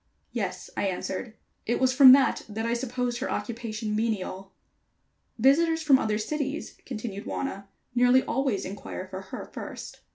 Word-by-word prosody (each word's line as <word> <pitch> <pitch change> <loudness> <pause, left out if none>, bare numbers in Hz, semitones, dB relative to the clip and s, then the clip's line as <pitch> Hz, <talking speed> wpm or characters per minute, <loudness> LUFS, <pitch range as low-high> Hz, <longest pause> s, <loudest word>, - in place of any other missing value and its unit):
"Yes," - - -4
I 200 - 0
answered. 190 +4 -4 0.3
"It 235 - +1
was 260 -1 +3
from 265 -1 +10
that 275 0 +4
that 220 +2 -3
I 230 - 0
supposed 245 0 -2
her - - -3
occupation 220 -2 -3
menial." 195 -3 -2 0.9
"Visitors 320 +7 +4
from 275 -4 +6
other 215 -3 0
cities," 285 +6 -3
continued 215 -4 -5
Wauna, 200 -7 -4 0.3
"nearly 245 +1 +5
always 265 -6 -1
inquire 190 -1 -6
for 190 0 -6
her 190 - -7
first." - - -8
235 Hz, 150 wpm, -27 LUFS, 210-265 Hz, 0.9 s, from